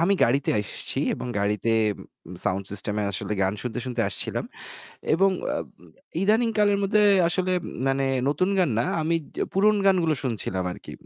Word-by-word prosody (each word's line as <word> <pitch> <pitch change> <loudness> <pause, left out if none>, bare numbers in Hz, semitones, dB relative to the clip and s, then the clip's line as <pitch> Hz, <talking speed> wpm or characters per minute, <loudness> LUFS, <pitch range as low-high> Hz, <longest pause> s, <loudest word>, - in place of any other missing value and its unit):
আমি 195 +4 +3
গাড়িতে 135 +4 +1
আসছি 100 - -6 0.2
এবং - - -6
গাড়িতে 105 +3 0 0.8
সাউন্ড 95 +1 0
সিস্টেম 105 +1 -2
এ - - 0
আসলে 95 - -3
গান 95 +1 +1
শুনতে, 125 -1 -4
শুনতে 120 -2 -1
আসছিলাম। - - -3 0.7
এবং 195 +4 +4 0.2
অব - - -3 0.6
ইদানিং 220 +4 +3
কালের 205 -1 +4
মধ্যে 210 +2 +3 0.3
আসলে 185 +2 0 0.4
মানে 135 0 +1 0.2
নতুন 165 +6 +1
গান 180 -5 +3
না - - +2 0.2
আমি 165 +2 +1 0.4
পুরনো 210 +2 +4
গানগুলো 175 -5 +3
শুনছিলাম 105 -7 -2
আরকি। - - -10
155 Hz, 150 wpm, -25 LUFS, -, 0.8 s, এবং